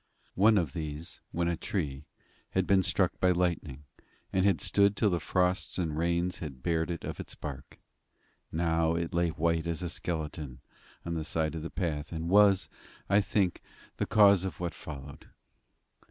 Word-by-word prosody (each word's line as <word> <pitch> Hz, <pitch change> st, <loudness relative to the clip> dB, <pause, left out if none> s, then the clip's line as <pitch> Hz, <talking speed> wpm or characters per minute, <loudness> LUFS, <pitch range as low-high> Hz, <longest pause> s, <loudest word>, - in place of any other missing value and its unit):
One 105 Hz, +3 st, +5 dB
of 80 Hz, -8 st, 0 dB
these, 80 Hz, +1 st, -6 dB
when 85 Hz, 0 st, 0 dB
a 85 Hz, -, +1 dB
tree, 75 Hz, -6 st, -3 dB, 0.5 s
had 95 Hz, 0 st, +2 dB
been 95 Hz, 0 st, +4 dB
struck 95 Hz, -1 st, 0 dB
by 90 Hz, -, +4 dB
lightning, 85 Hz, -6 st, 0 dB, 0.5 s
and 95 Hz, +1 st, +3 dB
had 95 Hz, -6 st, +3 dB
stood 100 Hz, +4 st, +3 dB
till 105 Hz, -3 st, +3 dB
the 85 Hz, -, +1 dB
frosts 90 Hz, +2 st, 0 dB
and 80 Hz, -5 st, -1 dB
rains 85 Hz, +2 st, 0 dB
had 70 Hz, -6 st, -7 dB
bared 80 Hz, 0 st, 0 dB
it 85 Hz, -2 st, -4 dB
of -, -, -5 dB
its -, -, -7 dB
bark. 70 Hz, -3 st, -8 dB, 0.7 s
Now 80 Hz, 0 st, +1 dB
it 85 Hz, 0 st, -2 dB
lay 85 Hz, 0 st, +2 dB
white 85 Hz, +1 st, 0 dB
as 85 Hz, +1 st, -2 dB
a 85 Hz, -, -2 dB
skeleton 75 Hz, -6 st, -4 dB, 0.5 s
by 85 Hz, -, -3 dB
the 80 Hz, -2 st, -2 dB
side 80 Hz, 0 st, -1 dB
of 80 Hz, -, -4 dB
the 80 Hz, -, -5 dB
path, 80 Hz, -5 st, -3 dB
and 80 Hz, 0 st, -3 dB
was, 100 Hz, -1 st, +5 dB, 0.4 s
I 100 Hz, +1 st, +6 dB
think, 95 Hz, -3 st, 0 dB, 0.4 s
the -, -, -1 dB
cause 100 Hz, -3 st, +6 dB
of 95 Hz, -, -4 dB
what 85 Hz, -1 st, -2 dB
followed. 70 Hz, -2 st, -9 dB
85 Hz, 175 wpm, -30 LUFS, 80-90 Hz, 0.7 s, I